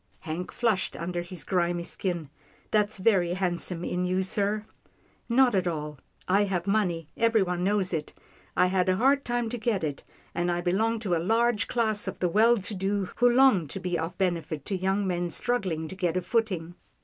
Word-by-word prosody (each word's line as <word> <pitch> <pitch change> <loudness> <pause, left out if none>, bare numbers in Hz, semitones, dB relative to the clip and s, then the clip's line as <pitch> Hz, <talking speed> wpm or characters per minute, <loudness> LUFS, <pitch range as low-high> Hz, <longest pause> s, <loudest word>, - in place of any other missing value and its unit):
Hank 175 +2 -5
flushed 225 -6 0
under 175 +1 -3
his 175 -1 -7
grimy 175 -2 0
skin. 170 -5 -3 0.2
" - - -32
That's 210 0 +1
very 185 -4 +2
handsome 180 -2 -1
in 180 0 -1
you, 185 +1 +1
sir." 205 +2 0 0.3
" - - -37 0.3
Not 245 0 +4
at 185 -2 +1
all. 150 -4 -4 0.3
I 200 +3 +3
have 185 -3 -2
money. 190 -5 0
Everyone 195 -6 +2
knows 195 -1 +1
it. 155 -2 -3 0.5
I - - +5
had 185 0 +1
a 185 - +3
hard 275 +6 +3
time 240 -1 -1
to 245 - -4
get 215 -5 0
it, 145 -3 -3 0.3
and 175 0 0
I 175 - 0
belong 205 +6 +1
to 190 -6 0
a 165 - 0
large 225 +2 +2
class 220 -4 0
of 190 - -4
the 180 - 0
well 225 +6 +5
to 205 +1 -3
do 195 +1 -1
who 200 - 0
wish, 185 - -7
who 245 0 +5
long 240 - +5
to 170 - -5
be 180 -1 -2
of 165 +2 -4
benefit 170 -6 -1
to 200 - -2
young 190 +2 0
men 175 -1 -1
struggling 180 -6 -1
to - - -7
get 180 -2 0
a - - +1
footing. 185 -5 -1
185 Hz, 210 wpm, -27 LUFS, 175-215 Hz, 0.5 s, I